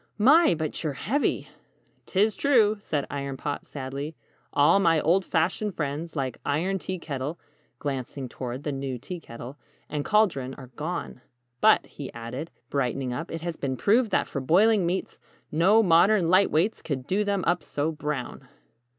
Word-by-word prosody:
"My, 280 Hz, -, +6 dB
but 155 Hz, 0 st, -3 dB
you're 155 Hz, -3 st, -1 dB
heavy!" 270 Hz, -, -1 dB, 0.6 s
"'Tis 205 Hz, +2 st, +2 dB
true," 225 Hz, -7 st, +4 dB
said 150 Hz, -8 st, -2 dB
Iron 140 Hz, -1 st, -4 dB
Pot, 145 Hz, +2 st, -4 dB
sadly, 140 Hz, +3 st, -5 dB, 0.4 s
"all 145 Hz, +7 st, +5 dB
my 165 Hz, -4 st, +4 dB
old 175 Hz, +6 st, +3 dB
fashioned 185 Hz, +4 st, 0 dB
friends, 150 Hz, +3 st, -3 dB
like 135 Hz, -3 st, -3 dB
Iron 180 Hz, +7 st, 0 dB
Tea 185 Hz, +1 st, -4 dB
Kettle 145 Hz, -1 st, -4 dB, 0.4 s
glancing 135 Hz, -1 st, -4 dB
toward 125 Hz, +2 st, -6 dB
the 150 Hz, -, -2 dB
new 135 Hz, -2 st, -3 dB
Tea 170 Hz, +8 st, -7 dB
Kettle 125 Hz, 0 st, -10 dB, 0.3 s
and 145 Hz, -1 st, -3 dB
Caldron, 150 Hz, -12 st, +2 dB
are 130 Hz, -1 st, -12 dB
gone. 155 Hz, -4 st, -4 dB, 0.4 s
But," -, -, +5 dB
he -, -, -8 dB
added, 120 Hz, +7 st, -6 dB, 0.2 s
brightening 130 Hz, -2 st, -1 dB
up, 165 Hz, +7 st, -5 dB
"it 165 Hz, -, -5 dB
has 170 Hz, -1 st, -4 dB
been 130 Hz, -2 st, -2 dB
proved 225 Hz, -, +3 dB
that -, -, +2 dB
for 140 Hz, -, -4 dB
boiling 190 Hz, +6 st, +4 dB
meats, 185 Hz, +2 st, -3 dB, 0.3 s
no 190 Hz, +8 st, +5 dB
modern 180 Hz, +1 st, +4 dB
'light 190 Hz, +2 st, +5 dB
weights' 180 Hz, +8 st, +1 dB
could 130 Hz, -4 st, -4 dB
'do 195 Hz, +7 st, +1 dB
them 200 Hz, -2 st, 0 dB
up 175 Hz, -1 st, +2 dB
so 145 Hz, +1 st, -2 dB
brown!'" 150 Hz, -4 st, -5 dB
160 Hz, 165 wpm, -26 LUFS, 140-190 Hz, 0.6 s, My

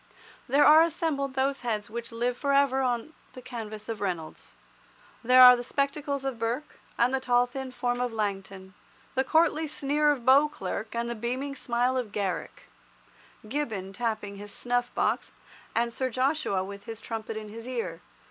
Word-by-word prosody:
There 280 Hz, +3 st, +4 dB
are 310 Hz, +1 st, +9 dB
assembled 290 Hz, -5 st, 0 dB
those 270 Hz, +1 st, +1 dB
heads 215 Hz, -4 st, -2 dB
which 235 Hz, +2 st, -6 dB
live 240 Hz, +2 st, -1 dB
for 280 Hz, +2 st, 0 dB
ever 275 Hz, -1 st, +3 dB
on 250 Hz, +4 st, -1 dB, 0.2 s
the 255 Hz, -, -10 dB
canvas 220 Hz, -4 st, -7 dB
of 225 Hz, -3 st, -5 dB
Reynolds. 175 Hz, -5 st, -4 dB, 0.7 s
There 255 Hz, +2 st, +7 dB
are 250 Hz, 0 st, +11 dB
the 240 Hz, -, -4 dB
spectacles 280 Hz, +1 st, -2 dB
of 265 Hz, -4 st, -3 dB
Burke, 235 Hz, +6 st, -3 dB, 0.2 s
and 245 Hz, +2 st, +3 dB
the 265 Hz, -, +2 dB
tall 245 Hz, -1 st, +3 dB
thin 265 Hz, +1 st, -6 dB
form 245 Hz, -1 st, -1 dB
of 250 Hz, -1 st, -1 dB
Langton, 195 Hz, -3 st, -4 dB, 0.4 s
the 265 Hz, -, +2 dB
courtly 315 Hz, +2 st, +2 dB
sneer 295 Hz, 0 st, +1 dB
of 255 Hz, -5 st, -3 dB
Beauclerk 260 Hz, -6 st, +2 dB
and 235 Hz, 0 st, -1 dB
the 235 Hz, -, -2 dB
beaming 255 Hz, +5 st, -3 dB
smile 245 Hz, 0 st, 0 dB
of 240 Hz, -5 st, -3 dB
Garrick, 200 Hz, -3 st, -3 dB, 0.8 s
Gibbon 215 Hz, -8 st, -3 dB
tapping 215 Hz, -2 st, -3 dB
his 205 Hz, 0 st, -8 dB
snuff 245 Hz, +2 st, -1 dB
box, -, -, 0 dB, 0.4 s
and 235 Hz, +1 st, +1 dB
Sir 260 Hz, +2 st, -1 dB
Joshua 255 Hz, -6 st, 0 dB
with 200 Hz, +1 st, -9 dB
his 225 Hz, -1 st, -7 dB
trumpet 225 Hz, 0 st, -5 dB
in 215 Hz, -1 st, -7 dB
his 230 Hz, +3 st, -9 dB
ear. 230 Hz, -10 st, -4 dB
245 Hz, 170 wpm, -28 LUFS, 220-270 Hz, 0.8 s, are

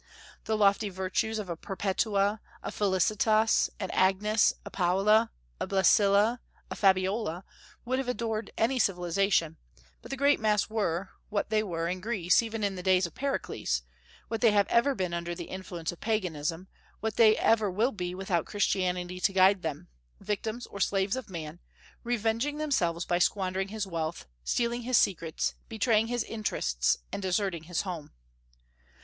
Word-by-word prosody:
The 220 Hz, -, 0 dB
lofty 205 Hz, +1 st, +3 dB
virtues 190 Hz, +4 st, -1 dB
of 210 Hz, -3 st, -4 dB
a 170 Hz, -, -3 dB
Perpetua, 200 Hz, +3 st, -1 dB, 0.2 s
a -, -, -4 dB
Felicitas, 215 Hz, +3 st, +2 dB
an -, -, -3 dB
Agnes, 210 Hz, +4 st, +3 dB
a -, -, -8 dB
Paula, 200 Hz, +5 st, +3 dB, 0.3 s
a -, -, -2 dB
Blessilla, 200 Hz, +4 st, +4 dB, 0.3 s
a -, -, -3 dB
Fabiola, 190 Hz, -1 st, +1 dB, 0.4 s
would 255 Hz, +2 st, 0 dB
have 265 Hz, -, -3 dB
adorned 225 Hz, -3 st, -2 dB
any 250 Hz, +4 st, +1 dB
civilization; 180 Hz, -3 st, +1 dB, 0.4 s
but -, -, -12 dB
the 270 Hz, -, -4 dB
great 285 Hz, +2 st, +3 dB
mass 215 Hz, -1 st, +1 dB
were, 195 Hz, -4 st, -1 dB, 0.2 s
what 210 Hz, 0 st, -2 dB
they 215 Hz, 0 st, +3 dB
were 170 Hz, -5 st, -3 dB
in 180 Hz, +1 st, -3 dB
Greece 195 Hz, -4 st, +2 dB
even 225 Hz, -1 st, -4 dB
in 200 Hz, -1 st, 0 dB
the 185 Hz, -, -6 dB
days 185 Hz, 0 st, +3 dB
of 170 Hz, -, -7 dB
Pericles, 265 Hz, -, -2 dB, 0.4 s
what 225 Hz, -, -3 dB
they 235 Hz, -, +6 dB
have 205 Hz, -1 st, +3 dB
ever 265 Hz, +4 st, +3 dB
been 180 Hz, -4 st, -2 dB
under 170 Hz, 0 st, -3 dB
the 170 Hz, -, -6 dB
influence 180 Hz, -3 st, -5 dB
of 175 Hz, -, -12 dB
Paganism, 180 Hz, -5 st, -2 dB, 0.3 s
what 220 Hz, -1 st, -3 dB
they 220 Hz, -2 st, +6 dB
ever 220 Hz, -2 st, +3 dB
will 220 Hz, +8 st, +1 dB
be 180 Hz, -3 st, -4 dB
without 185 Hz, -3 st, -1 dB
Christianity 180 Hz, -3 st, -1 dB
to 195 Hz, +1 st, +1 dB
guide 190 Hz, 0 st, +5 dB
them, 150 Hz, -, -5 dB, 0.3 s
victims 220 Hz, +3 st, -3 dB
or 200 Hz, -, -10 dB
slaves 195 Hz, +1 st, +1 dB
of 260 Hz, -5 st, -6 dB
man, 165 Hz, -2 st, -7 dB, 0.4 s
revenging 235 Hz, +4 st, 0 dB
themselves 180 Hz, -, 0 dB
by 175 Hz, -, +1 dB
squandering 190 Hz, 0 st, 0 dB
his 210 Hz, 0 st, -3 dB
wealth, 165 Hz, -2 st, -4 dB, 0.2 s
stealing 235 Hz, -, 0 dB
his 245 Hz, 0 st, +2 dB
secrets, 165 Hz, -4 st, 0 dB, 0.2 s
betraying 225 Hz, 0 st, +2 dB
his 240 Hz, 0 st, -1 dB
interests, 65 Hz, -, 0 dB
and -, -, -4 dB
deserting 185 Hz, -3 st, -1 dB
his 175 Hz, 0 st, -1 dB
home. 175 Hz, -6 st, -6 dB
200 Hz, 160 wpm, -29 LUFS, 180-220 Hz, 0.4 s, they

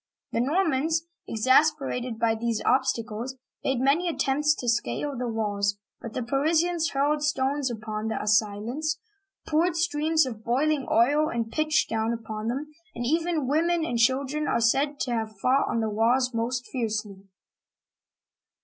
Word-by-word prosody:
The 230 Hz, -, 0 dB
Normans, 320 Hz, +1 st, +1 dB, 0.2 s
exasperated 260 Hz, 0 st, +2 dB
by 225 Hz, 0 st, +2 dB
these 225 Hz, 0 st, -1 dB
obstacles, 245 Hz, -1 st, 0 dB, 0.3 s
made 265 Hz, -2 st, 0 dB
many 300 Hz, +7 st, +2 dB
attempts 295 Hz, -1 st, +1 dB
to 245 Hz, -, -6 dB
scale 240 Hz, +4 st, 0 dB
the 250 Hz, 0 st, -3 dB
walls, 205 Hz, -3 st, -1 dB, 0.2 s
but 230 Hz, -, -7 dB
the 255 Hz, -, -2 dB
Parisians 320 Hz, +5 st, +1 dB
hurled 290 Hz, +2 st, +1 dB
stones 280 Hz, -1 st, 0 dB
upon 215 Hz, -1 st, -4 dB
the 220 Hz, -, -2 dB
assailants, 215 Hz, +9 st, 0 dB, 0.5 s
poured 325 Hz, +2 st, +2 dB
streams 315 Hz, -2 st, +2 dB
of 225 Hz, -4 st, -7 dB
boiling 275 Hz, +4 st, +1 dB
oil 290 Hz, +7 st, +3 dB
and 230 Hz, -1 st, -3 dB
pitch 310 Hz, +2 st, +1 dB
down 225 Hz, +1 st, -1 dB
upon 220 Hz, -1 st, -5 dB
them, 280 Hz, +6 st, -3 dB, 0.2 s
and 240 Hz, -, -3 dB
even 325 Hz, +1 st, 0 dB
women 330 Hz, +3 st, +1 dB
and 240 Hz, -6 st, -2 dB
children 275 Hz, +5 st, +1 dB
are -, -, +1 dB
said 280 Hz, +5 st, +2 dB
to 250 Hz, -, -1 dB
have 220 Hz, -3 st, -3 dB
fought 260 Hz, +6 st, +2 dB
on 230 Hz, -, 0 dB
the 220 Hz, -, -1 dB
walls 245 Hz, +4 st, +2 dB
most 240 Hz, +2 st, -2 dB
fiercely. 215 Hz, -5 st, -3 dB
260 Hz, 150 wpm, -26 LUFS, 225-300 Hz, 0.5 s, oil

